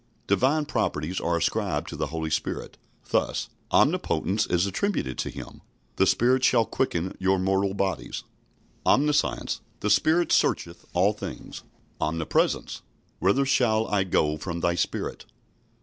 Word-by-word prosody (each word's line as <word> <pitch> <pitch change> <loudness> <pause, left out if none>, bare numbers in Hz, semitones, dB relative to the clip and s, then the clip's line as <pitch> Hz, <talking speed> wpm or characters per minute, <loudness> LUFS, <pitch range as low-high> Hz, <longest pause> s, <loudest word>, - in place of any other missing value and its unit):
Divine 135 +10 +2
properties 80 - -1
are 85 0 0
ascribed 85 - -1
to - - -6
the - - -2
Holy 80 0 -4
Spirit. 75 - -3 0.3
Thus - - 0 0.2
Omnipotence 95 +6 +2
is 90 +1 +2
attributed 100 - -1
to - - -1
Him - - -9 0.4
"The - - +4
Spirit 130 +2 +3
shall 115 -3 +4
quicken 95 -9 -2
your 95 0 +2
mortal 95 +1 +1
bodies", 95 -1 -2 0.6
Omniscience 150 +1 +1 0.2
"The 105 - +1
Spirit 165 - +3
searcheth 85 0 +1
all 95 +4 +3
things", 105 - -8 0.4
Omnipresence 80 +1 0 0.4
"Whither 100 +10 +3
shall 115 -5 +2
I 100 -2 +2
go 75 -4 +1
from 85 +1 -5
thy 85 0 +2
Spirit?" 85 - -3
95 Hz, 135 wpm, -26 LUFS, 85-120 Hz, 0.6 s, The